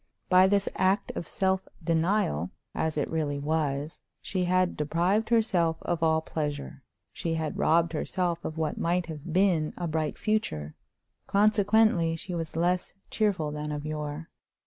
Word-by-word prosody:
By 185 +1 +7
this 200 0 +2
act 190 +2 +2
of 165 - -4
self 190 -1 0 0.2
denial, 160 - +1 0.2
as 160 -1 -1
it 150 - 0
really 150 -3 -1
was, 145 0 -2 0.2
she 185 -2 -2
had 185 0 +2
deprived 175 +9 +1
herself 180 -8 +2
of 170 -1 -1
all 160 -1 +3
pleasure; 145 -3 -4 0.3
she 165 -1 -2
had 160 -2 -3
robbed 165 +1 +3
herself 170 +1 -1
of 155 - -5
what 155 -2 -2
might 175 +1 +1
have 160 0 -7
been 175 -4 +2
a 175 - -3
bright 155 -1 -1
future; 75 - -1 0.5
consequently 205 -4 +3
she 180 +3 -6
was 165 -2 -4
less 175 +2 0 0.2
cheerful 190 -9 0
than 150 0 -4
of 150 0 -4
yore. 150 +1 -5
165 Hz, 150 wpm, -28 LUFS, 155-185 Hz, 0.5 s, By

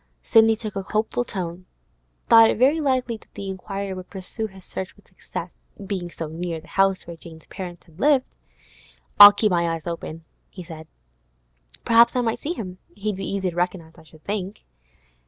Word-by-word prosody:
Sidney 225 -1 +5
took 215 -2 -7
a 195 - -1
hopeful 215 +5 -1
tone—thought 190 +4 +1
it - - 0
very 280 +7 +3
likely 255 -5 0
that - - -24
the 200 - -6
inquirer 195 +1 -5
would 185 -1 -9
pursue 200 +3 -5
his 190 -2 -16
search 190 -1 -6
with - - -24
success, - - -7 0.3
being 190 -3 -4
so 165 -1 -6
near 165 +1 -4
the 160 - -18
house 195 -1 +2
where 170 - -8
Jane's 160 -1 -13
parents 180 -3 -8
had 165 0 -20
lived. 280 -1 +4 0.9
'I'll 205 0 +13
keep 210 0 +1
my 170 -1 +2
eyes 160 - -10
open,' 165 -1 -6 0.2
he 185 - -10
said. 160 -2 -10 1.0
'Perhaps 235 +1 +5
I 250 - +2
might 225 -2 -1
see 320 - -3
him. 185 - -7 0.2
He'd 210 0 -3
be 195 - -5
easy 190 -2 -1
to - - -13
recognise, 175 -2 -2
I - - -16
should 155 0 -19
think. 200 0 -4
190 Hz, 185 wpm, -23 LUFS, 175-220 Hz, 1.0 s, I'll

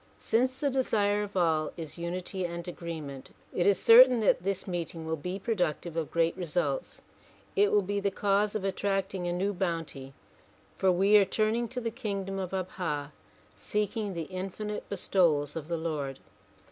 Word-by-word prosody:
Since 255 +3 +1
the 285 -2 +1
desire 210 -6 +1
of 205 -2 -5
all 160 -3 +1
is 165 0 -7
unity 180 +2 -4
and 170 0 -4
agreement 160 -6 -7 0.2
it 175 +1 +1
is 200 - +4
certain 245 +1 +8
that 205 - +3
this 195 +1 -2
meeting 170 -2 -4
will 160 0 -1
be 180 +5 -4
productive 175 -6 -2
of 165 -2 -2
great 165 0 +1
results. 180 - -2 0.5
It 410 0 +4
will 205 - +4
be 200 +2 -1
the 200 0 +1
cause 200 +1 +1
of 215 - -2
attracting 195 -1 -1
a - - 0
new 190 +3 0
bounty 165 -7 -3 0.6
for 190 - +3
we 195 +4 +5
are 205 - +6
turning 215 +4 0
to 250 +2 -5
the 230 -2 -3
king 210 -5 -3
dom 195 0 -4
of 185 -2 -3
Abha 175 -6 -3 0.4
seeking 210 -1 -2
the 165 - -2
infinite 190 +4 -5
bestowals 170 -7 +2
of 155 -2 -5
the 170 -1 -1
Lord. 150 -5 -3
185 Hz, 170 wpm, -29 LUFS, 170-205 Hz, 0.6 s, certain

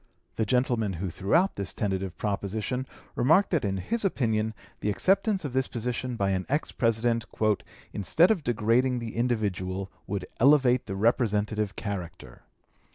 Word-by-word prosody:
The 110 - 0
gentleman 120 -4 +1
who 90 +1 -4
threw 95 - 0
out 185 +3 +3
this 100 -2 -3
tentative 95 -4 -2
proposition 105 +6 -2 0.3
remarked 160 +11 +4
that 165 -5 +1
in 95 -1 -1
his 225 - -2
opinion 110 - 0 0.2
the 105 - -1
acceptance 195 - +2
of 135 - -4
this 130 0 +1
position 125 +1 -3
by 100 -3 0
an 95 +1 -1
ex 145 +3 0
President 115 0 +1 0.7
"instead 165 - +3
of 185 -8 0
degrading 120 +2 +2
the 115 -2 -5
individual 100 -5 -1 0.2
would 100 -2 -3
elevate 130 -2 +4
the 95 - -3
representative 105 -1 +1
character." 95 -6 -6
115 Hz, 150 wpm, -27 LUFS, 100-130 Hz, 0.7 s, remarked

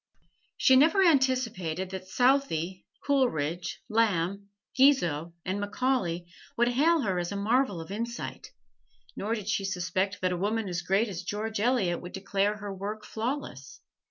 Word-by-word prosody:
She 260 - +5
never 325 +8 +5
anticipated 235 - +1
that 190 -1 -6
Southey, 190 - +1 0.2
Coleridge, 175 - 0
Lamb, 200 -3 0 0.3
Guizot 175 - +3
and 190 +2 -2
Macaulay 205 -5 -1 0.3
would 240 +1 +3
hail 310 +6 +3
her 190 -6 0
as 175 +1 -3
a - - -3
marvel 210 -1 +1
of 165 +3 -8
insight, 235 +3 -5 0.7
nor 220 +3 -1
did 210 -4 -7
she 210 -2 0
suspect 190 +1 -1
that 185 0 +1
a - - -2
woman 210 +3 -1
as 175 -1 -2
great 195 +6 +1
as 185 -4 -5
George 210 +3 -3
Eliot 210 -7 +1
would 180 - -9
declare 200 +2 0
her 205 -1 -6
work 210 +3 -5
flawless. 220 - -5
205 Hz, 150 wpm, -28 LUFS, 180-245 Hz, 0.7 s, She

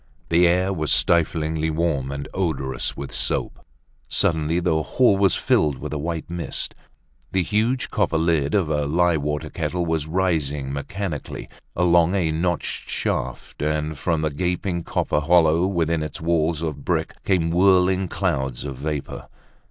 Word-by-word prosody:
The 85 +1 +5
air 90 +3 +2
was 75 -5 -1
stiflingly 80 -2 +2
warm 75 -4 -1
and 70 0 -5
odorous 75 -8 -2
with 70 - -6
soap. - - -3 0.5
Suddenly 80 +1 +1
the 80 -3 +1
hall 120 +5 +3
was 95 -2 +3
filled 75 -4 +2
with - - -6
a 75 - -2
white 80 +1 -3
mist. 85 0 -3 0.6
The 95 -1 +2
huge 110 +7 0
copper 80 - +1
lid 80 -2 +1
of 100 -4 +3
the 75 -2 -1
lye 85 +2 +3
water 75 0 -3
kettle 90 -1 -2
was 80 -2 -1
rising 75 -6 0
mechanically 75 +2 -5 0.3
along 85 0 +4
a 85 -5 +1
notched 85 +2 -2
shaft, - - -3
and 75 +1 -1
from 80 +2 -1
the 75 - 0
gaping 90 +3 -1
copper 75 - 0
hollow 85 +2 +4
within 85 -4 0
its 75 - -5
wall 80 -1 +2 0.2
of 75 -3 -5
bricks - - -1
came 85 -4 +1
whirling 95 +1 +4
clouds 70 -9 -2
of 70 -3 -5
vapor. 75 0 -4
80 Hz, 150 wpm, -23 LUFS, 75-90 Hz, 0.6 s, The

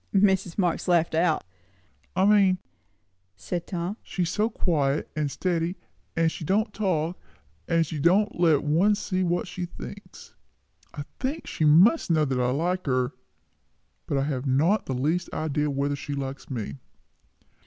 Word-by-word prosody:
Mrs. 190 -3 +3
Marx 180 -3 0
laughed 170 -2 +3
out. 165 0 +2 0.7
"I 185 +1 +3
mean," 200 -3 +5 0.8
said 175 - -5
Tom, 180 +3 -3
"she 180 - -3
is 170 - -1
so 215 +2 +1
quiet 150 -9 0
and 150 -2 0
steady, 175 +2 -1 0.4
and 165 0 +2
she - - -7
don't 210 +6 +1
talk, 180 -4 -1 0.5
and 165 -1 +2
she 155 0 -5
don't 185 +6 +2
let 160 -5 +4
one 170 +8 +3
see 185 -2 -2
what 175 -1 0
she 180 - -4
thinks. - - -11 0.6
I 145 - -6 0.2
think 280 +5 -3
she 155 - -1
must 180 - +5
know 160 -2 +3
I 125 -2 +1
like 175 +6 -1
her 125 -1 +1 1.0
but 140 - 0
I 135 - +1
have 140 -2 -2
not 160 +11 +2
the 130 - -2
least 160 +7 -1
idea 150 -1 -1
whether 140 +1 -1
she 140 +1 -5
likes 135 0 -5
me." 105 - -4
165 Hz, 155 wpm, -26 LUFS, 145-185 Hz, 1.0 s, mean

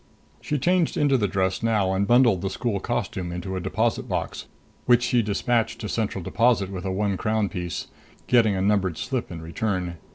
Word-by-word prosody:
She 150 - -1
changed 175 +4 +1
into 145 -2 +3
the 105 -5 +2
dress 95 -1 0
now 105 -4 +1
and 100 +1 0
bundled 120 -6 +4
the 95 - -1
school 105 +1 -2
costume 95 -5 -3
into 90 +2 -4
a - - -2
deposit 110 +6 -1
box, - - -3 0.4
which 125 0 +5
she 125 -1 +2
dispatched 115 +2 0
to 105 - -3
Central 105 -4 -2
Deposit 110 -2 +2
with 95 0 -6
a 95 - -1
one 100 0 0
crown 110 -1 0
piece, 90 -2 -4 0.4
getting 115 -5 +4
a 95 - -1
numbered 95 -4 +1
slip 130 -7 -3
in 80 -2 -7
return. 90 0 -2
105 Hz, 190 wpm, -24 LUFS, 95-120 Hz, 0.4 s, which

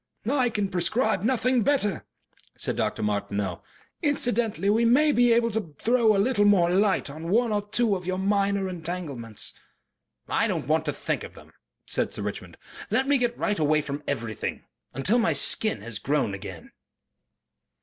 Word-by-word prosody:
"I 255 -1 +2
can 210 -3 -1
prescribe 190 +3 0
nothing 250 +2 +2
better," 210 - 0 0.5
said - - -1
Dr. - - -1
Martineau. 100 -3 -2 0.4
"Incidentally, 240 - 0
we 220 +3 +3
may 275 +6 +4
be 245 -3 +4
able 230 0 +3
to 205 -9 -4
throw 230 -2 +4
a - - +1
little 205 +1 +2
more 190 -4 +4
light 195 +2 +2
on 155 +4 -7
one 230 +4 +2
or 205 -1 +1
two 220 -1 +2
of 180 -1 -7
your 185 0 -1
minor 200 0 +1
entanglements." 160 - -4 0.7
"I - - +1
don't - - -3
want 160 +1 +1
to 145 - -1
think - - -3
of - - -10
them," - - -16 0.3
said - - -1
Sir - - -4
Richmond. - - -6 0.3
"Let 265 +1 +1
me 285 -1 +3
get 240 -1 0
right 205 -5 -1
away 155 0 +3
from 145 0 -5
everything. 115 -6 -3 0.3
Until 185 - +1
my 225 - +2
skin 215 - +2
has 110 -1 -6
grown 140 -7 0
again." 95 -4 -8
200 Hz, 170 wpm, -26 LUFS, 150-235 Hz, 0.7 s, may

